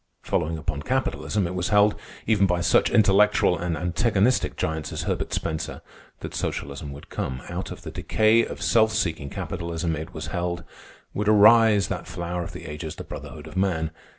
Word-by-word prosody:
Following 80 +1 -1
upon 70 -2 -3
Capitalism, 110 - -1
it 85 - -3
was 90 -1 -1
held, 105 0 +5 0.3
even 105 -3 +3
by 90 -1 +1
such 85 - +3
intellectual 105 -2 +4
and 85 -2 -2
antagonistic 100 +6 +1
giants 80 -1 -2
as - - -3
Herbert - - -2
Spencer, 80 -1 -3 0.4
that - - -6
Socialism 70 +1 -4
would 70 +1 -11
come. 65 -1 -4
Out - - -4
of - - -9
the - - -6
decay 110 +2 +3
of - - -6
self 110 -2 +4
seeking 80 -8 -1
capitalism, 85 +2 -3
it 80 +4 -6
was - - -6
held, 85 -1 -2 0.5
would 105 +1 0
arise 110 -1 +6
that 90 -4 -4
flower 90 0 -4
of 85 - -5
the - - -9
ages, 75 +1 -6
the - - -7
Brotherhood 75 -1 -9
of 80 - -11
Man. 85 -5 0
90 Hz, 180 wpm, -25 LUFS, 80-105 Hz, 0.5 s, arise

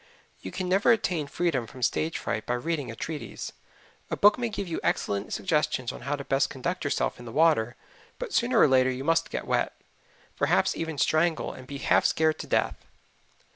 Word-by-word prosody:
You 95 - -7
can 185 - -4
never 195 +5 +4
attain 180 -9 +1
freedom 140 -8 -1
from 125 +3 -9
stage 155 +6 0
fright 110 - -3
by 125 - +1
reading 145 0 -2
a 115 - -6
treatise. 155 +4 -5 0.6
A - - -2
book 205 +1 +6
may 240 -2 -1
give 200 -3 -4
you 165 - -3
excellent 100 0 -1
suggestions 150 -8 0
on - - -10
how 145 +1 -1
best 140 -1 +1
to - - -10
conduct 170 +7 -3
yourself 145 - -1
in 120 - -10
the 115 - -7
water, 140 -5 +3 0.4
but - - -6
sooner 240 -1 +3
or - - +7
later 130 -1 +4
you 130 +1 -3
must 165 +3 +2
get - - -4
wet, - - -1 0.6
perhaps - - +2
even 160 -2 -4
strangle 160 +4 +1
and 130 -1 -11
be 140 - -6
"half - - +3
scared 155 -1 +2
to - - -6
death." - - 0
150 Hz, 200 wpm, -27 LUFS, 130-170 Hz, 0.6 s, or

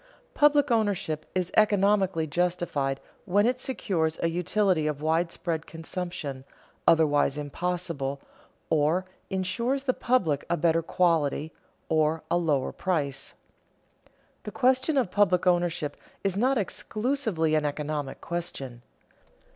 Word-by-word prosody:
_Public 290 -2 +4
ownership 200 -9 0
is 185 -1 -1
economically 200 -5 +3
justified 155 -4 -1 0.3
when 205 +2 +3
it 250 +1 +1
secures 175 -12 -1
a 165 - +3
utility 180 -1 +1
of 150 -1 -3
widespread 165 0 -1
consumption, 165 -5 -5 0.4
otherwise 145 -3 +4
impossible, 150 -2 -3 0.5
or 160 +4 +2 0.2
insures 235 +8 -1
the 260 -2 +1
public 180 - +1
a 175 - +1
better 165 +1 +2
quality 160 -3 +1 0.3
or 155 0 +1
a - - +4
lower 150 -6 +1
price._ 145 -7 -2 1.1
The - - -7
question 260 +3 +2
of 240 -9 +1
public 185 -3 +3
ownership 175 -4 +1 0.3
is 195 -2 0
not 255 +6 +2
exclusively 215 - -1
an 155 -1 +3
economic 145 -1 -3
question. 140 -8 -5
175 Hz, 115 wpm, -27 LUFS, 155-200 Hz, 1.1 s, Public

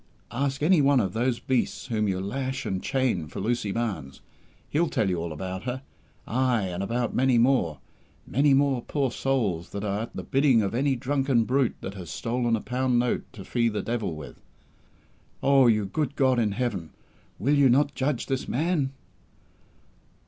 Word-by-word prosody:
Ask 135 +3 -1
any 170 0 +5
one 140 -1 +4
of 95 -5 -1
those 120 +1 +1
beasts 130 0 -1
whom 110 -4 0
you 95 -2 0
lash 130 +7 -3
and 95 -1 -2
chain 125 - 0
for - - -7
Lucy 105 0 -1
Barnes. 100 - -3 0.5
He'll 160 +2 +1
tell 105 - +1
you 90 -2 0
all 85 0 -3
about 95 +6 -5
her 130 +1 -3 0.4
ay, 125 -3 +1
and 90 +1 -4
about 120 +4 -1
many 130 -1 +3
more 115 - +3 0.5
many 140 +2 +3
more 135 -2 +2
poor 135 -2 -1
souls 110 -12 -1
that 100 - -5
are 100 -1 -1
at 115 - -7
the - - -4
bidding 135 -5 +3
of 100 - -2
any 135 +3 +1
drunken 135 -1 +1
brute 130 +2 +1
that 95 - -5
has 90 -4 -8
stolen 120 +2 0
a 110 - -3
pound 125 0 0
note 120 0 0
to 100 -5 -10
fee 115 -1 +1
the 105 -1 -3
Devil 115 -8 -2
with! 70 -5 -10 1.0
Oh, 135 -2 +5
you 105 -3 +3
good 145 +7 -2
God 130 -3 +3
in 105 -3 +1
Heaven, 100 -8 -2 0.5
will 140 +7 +1
You 140 -2 +5
not 145 +3 +3
judge 135 -1 -1
this 135 -1 -2
man?" 145 -1 0
120 Hz, 180 wpm, -26 LUFS, 105-135 Hz, 1.0 s, any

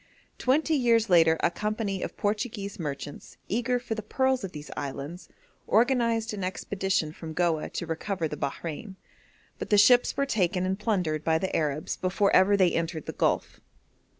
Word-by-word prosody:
Twenty 305 +5 +2
years 230 -6 +3
later 165 -2 +6
a 170 - +2
company 210 -1 -2
of - - -5
Portuguese 205 -1 -2
merchants, 145 -2 -6
eager 245 +3 0
for 245 -2 -4
the 220 - -4
pearls 260 +3 0
of 190 - -4
these 150 -2 -9
islands, 145 +5 -6 0.4
organised 230 -1 +2
an 200 -2 -4
expedition 190 -2 -1
from 160 -1 -8
Goa 165 -2 0
to - - -4
recover 165 +1 -2
the 150 - -5
Bahrein, 160 +7 -5 0.6
but - - -5
the 210 - +4
ships 245 +4 +5
were 280 - +2
taken 185 -7 0
and 190 +2 -1
plundered 180 -9 0
by 160 0 +2
the 190 +3 -2
Arabs 150 -1 -1
before 195 +2 +1
ever 200 +2 +5
they 185 -3 +4
entered 165 -2 -2
the - - -5
Gulf. - - 0
195 Hz, 170 wpm, -27 LUFS, 165-225 Hz, 0.6 s, later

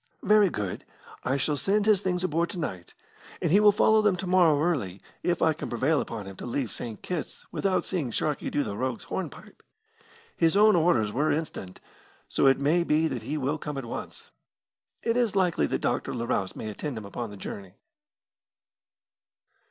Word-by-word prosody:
"Very 210 -2 +5
good. 100 - -4 0.4
I 135 +2 +1
shall 145 +2 0
send 200 +8 +1
his 210 -3 +4
things 180 -2 -1
aboard 170 -1 0
to 185 - -5
night; 95 - -5 0.4
and - - 0
he 200 - +6
will 210 0 +7
follow 220 +1 +4
them 210 -3 +3
to 180 - -5
morrow 175 -5 +4
early 135 - -1 0.2
if 175 -1 0
I 160 - +4
can 155 - -6
prevail 135 +6 +1
upon 110 -3 -6
him 95 0 -9
to - - -7
leave 120 -3 -2
St. 115 -3 -7
Kitt's 175 -4 -5
without 195 -2 0
seeing 165 -9 -2
Sharkey 150 +6 -1
do 145 - 0
the 100 - -4
rogue's 125 +1 -2
hornpipe. - - -6 0.7
His 165 +3 +3
own 215 0 +6
orders 145 -12 +2
were 145 +6 +1
instant, 145 - -4 0.5
so - - +2
it 135 - +5
may 155 +5 +2
be 160 0 +2
that 125 -3 -4
he 140 +8 -3
will 145 +2 -1
come 150 -1 -5
at 135 - -4
once. 115 - -7 0.7
It 230 0 +1
is 235 -5 +1
likely 180 -3 +2
that - - -2
Dr. - - -1
Larousse 115 -5 -1
may - - -6
attend 130 +4 -5
him 110 - -6
upon 115 +3 -5
the 105 - -10
journey." 95 0 -8
150 Hz, 190 wpm, -27 LUFS, 120-180 Hz, 0.7 s, will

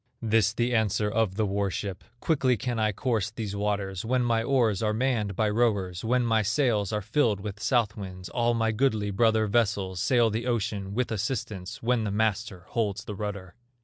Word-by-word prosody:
This 110 -2 +2
the 120 +2 0
answer 105 -2 +1
of 110 -4 +1
the 110 0 +1
war 100 0 0
ship: 95 +1 -5 0.2
"Quickly 130 -6 +2
can 120 +1 -2
I 110 -1 +2
course 110 -1 -1
these 110 -2 -5
waters, 100 -2 -2
When 125 +2 +1
my 115 -1 +2
oars 115 -5 +2
are 105 -1 +1
manned 115 -5 0
by 110 +3 +1
rowers, 105 -5 0
When 125 +2 +2
my 115 -1 +3
sails 110 -2 +1
are 105 -1 -2
filled 110 -1 +1
with 105 +1 -6
south 110 -1 +1
winds, 95 -3 -7
All 120 +2 +1
my 115 -1 +1
goodly 110 -3 +1
brother 110 +2 +3
vessels 100 -4 0
Sail 120 -3 +3
the 115 +3 -2
ocean 105 -4 -2
with 125 0 0
assistance, 110 -1 -4
When 120 -1 +2
the 105 - -1
master 105 -3 -1
holds 105 -3 -1
the 105 - -5
rudder." 100 -3 -5
110 Hz, 190 wpm, -27 LUFS, 100-115 Hz, 0.2 s, my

